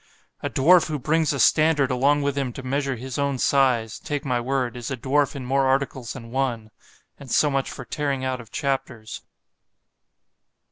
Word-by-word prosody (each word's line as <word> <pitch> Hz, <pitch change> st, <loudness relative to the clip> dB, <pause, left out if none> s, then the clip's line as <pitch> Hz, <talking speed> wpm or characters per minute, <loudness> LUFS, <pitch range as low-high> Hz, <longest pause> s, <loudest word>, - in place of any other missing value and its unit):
=>A -, -, -2 dB
dwarf 170 Hz, +5 st, +5 dB
who 155 Hz, -2 st, -2 dB
brings 155 Hz, +3 st, +1 dB
a 140 Hz, -, -3 dB
standard 150 Hz, -2 st, +4 dB
along 140 Hz, +3 st, +2 dB
with 140 Hz, -1 st, 0 dB
him 135 Hz, -3 st, -1 dB
to 135 Hz, -, -8 dB
measure 135 Hz, +1 st, -1 dB
his 130 Hz, +3 st, -6 dB
own 140 Hz, -1 st, 0 dB
size—take 135 Hz, +3 st, +1 dB
my 125 Hz, -3 st, 0 dB
word, 130 Hz, -1 st, -1 dB
is 120 Hz, -2 st, -5 dB
a 135 Hz, -, -3 dB
dwarf 140 Hz, +4 st, +1 dB
in 135 Hz, -2 st, -6 dB
more 135 Hz, +1 st, +2 dB
articles 130 Hz, -2 st, -1 dB
than 115 Hz, -3 st, -10 dB
one.—And 125 Hz, +1 st, -6 dB
so 150 Hz, +5 st, +3 dB
much 135 Hz, -1 st, -1 dB
for 135 Hz, -, -8 dB
tearing 140 Hz, -1 st, -2 dB
out 130 Hz, -1 st, -2 dB
of 115 Hz, -, -15 dB
chapters. 130 Hz, -6 st, -3 dB
135 Hz, 175 wpm, -24 LUFS, 125-140 Hz, -, dwarf